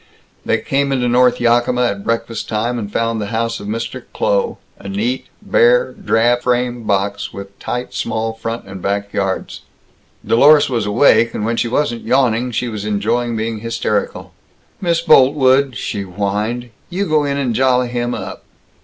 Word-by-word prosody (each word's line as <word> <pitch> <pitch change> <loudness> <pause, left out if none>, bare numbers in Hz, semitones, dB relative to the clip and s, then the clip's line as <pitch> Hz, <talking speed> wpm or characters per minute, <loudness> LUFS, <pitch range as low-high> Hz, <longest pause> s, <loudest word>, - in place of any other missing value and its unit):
They - - +1
came 140 0 -1
into 125 -2 +1
North 125 0 +3
Yakima 120 +1 +2
at 100 -4 -1
breakfast 115 -1 -2
time, 115 +3 -1
and 105 -2 -6
found 115 0 -1
the 105 - -3
house 115 +1 -2
of 100 - -8
Mr. 115 +2 -4
Kloh, - - 0 0.2
a - - -8
neat, 220 +6 -2 0.2
bare, - - +3
drab 120 +2 +1
frame 125 -1 -1
box, 100 0 -1
with 100 0 -10
tight 125 +1 -4
small 110 0 -2
front 115 +1 -5
and 95 -1 -9
back 100 +1 -2
yards. 95 -1 -2 0.6
Dlorus 145 +4 +5
was 115 -4 -1
awake, 115 +1 +4
and 105 - -2
when 115 +1 0
she 120 - 0
wasn't 120 -1 -1
yawning, 125 -1 +1
she 120 +1 -2
was 110 -3 -5
enjoying 115 +3 -1
being 110 0 -3
hysterical. 115 -2 -2 0.5
"Miss 170 -3 +1
Boltwood," 135 -4 +4
she 100 - -3
whined, 105 +5 -3 0.2
"you 190 +3 -1
go 155 -3 +2
in 140 -1 -1
and 130 -4 0
jolly 125 0 +2
him 120 0 -2
up." - - -7
120 Hz, 165 wpm, -17 LUFS, 110-130 Hz, 0.6 s, Dlorus